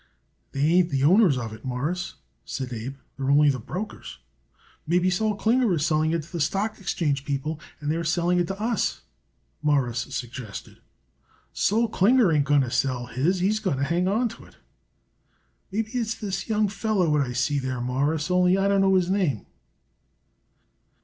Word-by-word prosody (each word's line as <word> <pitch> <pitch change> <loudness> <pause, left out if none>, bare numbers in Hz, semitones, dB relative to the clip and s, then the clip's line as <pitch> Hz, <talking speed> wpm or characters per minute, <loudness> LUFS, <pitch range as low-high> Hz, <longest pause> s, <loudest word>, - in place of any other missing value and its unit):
"They 135 - -3
ain't 180 0 +4
the 135 -3 0
owners 175 - +5
of 115 -3 -4
it, 110 - -12
Mawruss," 140 +8 -3 0.3
said 130 -2 -5
Abe. 120 +4 -5 0.2
"They're 135 -1 -3
only 145 +1 +5
the 130 - -4
brokers." 180 - -7 0.7
"Maybe 180 +3 +2
Sol 215 +3 0
Klinger 230 +2 +2
is 150 -1 0
selling 155 -1 +2
it 165 -1 -1
to 170 - -16
the 170 - -4
stock 200 +8 -1
exchange 150 -7 -1
people 145 +2 -3 0.2
and 150 -1 -2
they're 165 +1 -1
selling 175 +2 +1
it 175 - +1
to 195 +2 -5
us," 225 +2 -1 0.6
Morris 135 -6 +1
suggested. 120 -4 -7 0.7
"Sol 225 +3 +2
Klinger 225 -1 +4
ain't 150 -3 +2
going 145 -1 +4
to 125 -3 -2
sell 125 -2 0
his. 170 +10 0
He's 210 +4 +2
going 185 -10 -1
to 135 - -1
hang 170 +5 +1
on 225 +6 +2
to - - -12
it. - - -19 1.2
Maybe 220 +2 -2
it's 230 -3 -1
this 195 +1 -4
young 215 -1 +2
feller 205 -2 0
what 150 -1 +2
I 125 -3 -2
see 140 +4 0
there, 130 -2 -3
Mawruss, 145 +7 -1
only 180 +1 +4
I 195 0 +2
don't 200 -1 +3
know 190 0 +4
his 185 -1 +2
name." 170 - 0
165 Hz, 175 wpm, -25 LUFS, 140-195 Hz, 1.2 s, owners